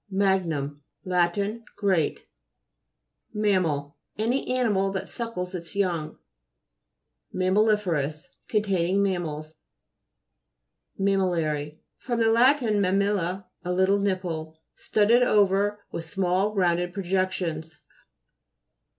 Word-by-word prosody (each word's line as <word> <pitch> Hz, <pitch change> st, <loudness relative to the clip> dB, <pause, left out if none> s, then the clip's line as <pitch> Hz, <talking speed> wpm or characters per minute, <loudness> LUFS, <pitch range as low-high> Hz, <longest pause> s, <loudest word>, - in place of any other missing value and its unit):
MAG'NUM 170 Hz, -8 st, 0 dB, 0.2 s
Lat. 175 Hz, -1 st, +1 dB, 0.4 s
Great. 185 Hz, -7 st, 0 dB, 1.1 s
MAM'MAI. 180 Hz, -9 st, +1 dB, 0.3 s
Any 235 Hz, +5 st, 0 dB
animal 215 Hz, -7 st, +1 dB
that 190 Hz, -, -3 dB
suckles 210 Hz, -6 st, -4 dB
its 170 Hz, 0 st, -7 dB
young. 170 Hz, -6 st, -1 dB, 1.2 s
MAMMALI'FEROTJS 185 Hz, -6 st, +1 dB, 0.2 s
Containing 195 Hz, -3 st, +1 dB
mam 185 Hz, -3 st, 0 dB
mals. 155 Hz, 0 st, -6 dB, 1.5 s
MAMMI'LLARY 165 Hz, -6 st, 0 dB, 0.2 s
fr. 245 Hz, -, -3 dB
lat. 235 Hz, +5 st, +4 dB
mammilla, 200 Hz, -3 st, +1 dB, 0.2 s
a 180 Hz, -, -2 dB
little 190 Hz, +2 st, +3 dB
nipple. 175 Hz, -5 st, -2 dB, 0.2 s
Studded 220 Hz, +4 st, +3 dB
over 205 Hz, -2 st, +2 dB
with 165 Hz, -, -4 dB
small 190 Hz, +4 st, 0 dB
rounded 175 Hz, -1 st, +1 dB
projections. 180 Hz, -4 st, -2 dB
190 Hz, 85 wpm, -26 LUFS, 170-205 Hz, 1.5 s, lat